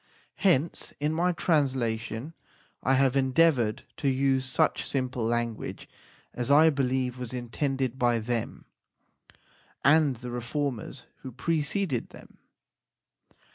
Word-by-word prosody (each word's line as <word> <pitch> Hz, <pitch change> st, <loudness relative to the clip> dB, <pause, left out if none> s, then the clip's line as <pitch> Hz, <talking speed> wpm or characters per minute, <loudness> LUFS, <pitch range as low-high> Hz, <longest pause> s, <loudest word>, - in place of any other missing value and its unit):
Hence 170 Hz, -5 st, +1 dB
in 150 Hz, +2 st, 0 dB
my 175 Hz, +3 st, +2 dB
translation 130 Hz, -5 st, -1 dB, 0.5 s
I 135 Hz, +2 st, +2 dB
have 135 Hz, 0 st, +3 dB
endeavoured 130 Hz, -4 st, +2 dB
to 140 Hz, -, 0 dB
use 135 Hz, 0 st, +1 dB
such 130 Hz, -, +1 dB
simple 130 Hz, -2 st, -2 dB
language 115 Hz, -1 st, -2 dB, 0.5 s
as 120 Hz, +2 st, -3 dB
I 155 Hz, +3 st, +6 dB
believe 130 Hz, -2 st, -1 dB
was 125 Hz, -1 st, -5 dB
intended 130 Hz, +1 st, -2 dB
by 120 Hz, -1 st, +3 dB
them 115 Hz, +1 st, -3 dB, 1.2 s
and 145 Hz, -1 st, +5 dB
the 125 Hz, +1 st, -8 dB
reformers 125 Hz, +1 st, -4 dB
who 130 Hz, -, -9 dB
pre 155 Hz, +6 st, -1 dB
ceded 145 Hz, -, -1 dB
them. -, -, -15 dB
130 Hz, 115 wpm, -27 LUFS, 120-145 Hz, 1.2 s, I